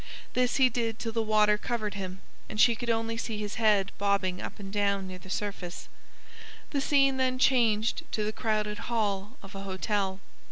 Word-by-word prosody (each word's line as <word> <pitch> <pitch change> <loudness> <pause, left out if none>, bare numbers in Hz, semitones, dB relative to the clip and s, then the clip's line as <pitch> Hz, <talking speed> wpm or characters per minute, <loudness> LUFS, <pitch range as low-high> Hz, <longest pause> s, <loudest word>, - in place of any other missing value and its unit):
This 250 -1 +2
he 265 -1 +6
did 230 -2 -1
till 230 - -3
the 225 0 0
water 210 -1 +3
covered 215 -3 -2
him, 190 -2 -6 0.3
and 215 - -5
she 235 - +7
could 235 +1 -5
only 225 0 0
see 225 -1 -3
his 210 +1 -4
head 205 -3 +4
bobbing 200 -2 +1
up - - -6
and 195 -1 -7
down 200 -2 +1
near 185 -1 -7
the 185 - -13
surface. 195 -3 -4 0.8
The 280 - 0
scene 275 -1 +3
then 255 -1 +1
changed 235 -4 +3
to 215 - 0
the 215 +1 -2
crowded 215 -2 -1
hall 210 0 -1
of 195 +1 -11
a 195 - -6
hotel. 195 0 -1
210 Hz, 190 wpm, -29 LUFS, 200-230 Hz, 0.8 s, she